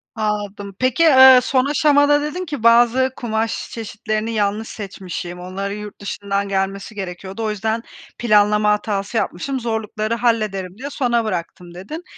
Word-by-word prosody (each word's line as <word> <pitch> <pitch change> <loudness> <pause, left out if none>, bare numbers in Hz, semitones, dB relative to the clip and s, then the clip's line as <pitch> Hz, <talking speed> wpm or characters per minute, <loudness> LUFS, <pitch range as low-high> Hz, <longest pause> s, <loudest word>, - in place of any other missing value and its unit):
Anladım. 205 -2 -3
Peki, 255 +5 +2
eee, 265 -4 +9
son 260 -1 +2
aşamada 290 0 +3
dedin 310 +5 -4
ki, 290 -8 -6
"Bazı 240 +3 +4
kumaş 225 -2 -2
çeşitlerini 215 0 -3
yanlış 210 +1 -1
seçmişim, 185 -3 -7
onların 195 +3 -5
yurt 210 -1 -9
dışından 200 0 -3
gelmesi 195 +2 -2
gerekiyordu. 190 +2 -6
O 220 - 0
yüzden 220 +2 -2 0.3
planlama 210 -2 +3
hatası 210 +1 -1
yapmışım, 260 +7 -2
zorlukları 220 -1 -2
hallederim 210 -6 -1
diye 275 +4 -6
sona 240 -5 0
bıraktım." 175 -2 -5
dedin. 205 - -8
215 Hz, 140 wpm, -20 LUFS, 200-240 Hz, 0.3 s, eee